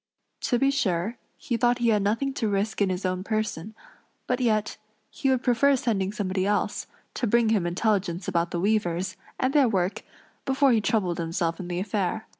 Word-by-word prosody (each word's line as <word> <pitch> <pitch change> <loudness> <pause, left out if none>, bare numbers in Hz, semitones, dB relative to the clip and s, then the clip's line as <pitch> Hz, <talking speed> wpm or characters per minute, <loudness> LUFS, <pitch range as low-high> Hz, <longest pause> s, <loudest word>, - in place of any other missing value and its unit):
To 245 - +3
be 275 +2 +3
sure, 200 -3 -1 0.2
he 255 -7 -2
thought 240 +1 +3
he 240 -2 +2
had 210 -2 +3
nothing 230 +7 0
to 230 -5 -1
risk 205 +1 -1
in 200 - +3
his 185 +1 -3
own 185 0 -1
person; 215 -2 -3 0.5
but 250 0 0
yet, 215 -4 0 0.3
he 270 - -1
would 260 -1 +1
prefer 275 +3 +4
sending 205 -7 0
somebody 190 -3 -2
else, 205 0 -1 0.3
to 240 - -1
bring 235 +1 +3
him 200 -6 +2
intelligence 185 -1 0
about 170 -2 0
the 170 - -3
weavers, 185 -2 0 0.2
and 260 +1 +1
their 280 -5 +5
work, 190 -2 0 0.4
before 270 0 +3
he 225 -2 +3
troubled 195 -5 0
himself 165 0 -1
in 180 - -5
the 175 0 -2
affair. 200 +1 -2
210 Hz, 190 wpm, -26 LUFS, 185-235 Hz, 0.5 s, their